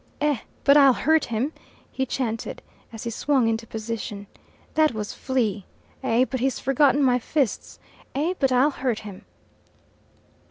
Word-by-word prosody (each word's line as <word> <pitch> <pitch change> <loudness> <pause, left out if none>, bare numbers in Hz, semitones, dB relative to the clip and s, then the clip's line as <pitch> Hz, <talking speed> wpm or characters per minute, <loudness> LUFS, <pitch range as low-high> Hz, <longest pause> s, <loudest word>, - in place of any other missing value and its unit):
"Eh, 290 -4 +1 0.2
but 280 - +6
I'll 275 -3 +7
hurt 315 0 +2
him," 240 +7 -2 0.4
he 265 0 -2
chanted, 230 -3 -3 0.3
as 225 -1 -8
he 235 - -3
swung 265 +1 +1
into 225 0 -1
position. 220 -2 -5 0.5
"That 310 -6 +3
was 210 -1 -4
Flea. 225 -7 -1 0.4
Eh, 255 -1 +2
but 260 0 -4
he's 265 +1 0
forgotten 270 +1 +3
my 250 -2 +3
fists; 265 0 -2 0.4
eh, 310 +6 0
but 270 -2 +2
I'll 260 +4 +4
hurt 255 -5 -2
him." 205 -3 -10
255 Hz, 150 wpm, -24 LUFS, 225-275 Hz, 0.5 s, I'll